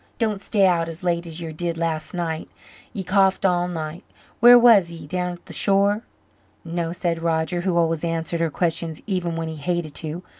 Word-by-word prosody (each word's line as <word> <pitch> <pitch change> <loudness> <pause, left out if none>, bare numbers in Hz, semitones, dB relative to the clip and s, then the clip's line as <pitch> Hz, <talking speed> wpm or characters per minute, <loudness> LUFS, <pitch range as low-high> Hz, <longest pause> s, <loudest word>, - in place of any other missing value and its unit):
Don't 215 -4 -1
stay 200 -1 +2
out 170 -3 +2
as 165 +3 -9
late 170 -1 0
as 165 0 -6
ye 165 -1 -5
did 170 +1 -3
last 160 -2 -2
night. 165 -2 -3 0.4
Ye 195 - -5
coughed 190 +1 +2
all 175 -1 +2
night. 160 -1 -5 0.4
Where 240 +1 +9
was 225 -7 +6
ye 165 -2 -9
down 180 +2 -2
at 175 - -14
the - - -10
shore?" 200 +1 +2 0.6
"No," 165 0 -2
said 170 -1 -2
Roger, 165 +1 0
who 180 -1 0
always 165 -1 +1
answered 165 0 -2
her 165 -1 +1
questions 165 0 -2
even 180 -5 -2
when 165 0 -3
he 160 -1 -6
hated 170 0 -2
to. 160 +4 -5
170 Hz, 195 wpm, -23 LUFS, 165-185 Hz, 0.6 s, Where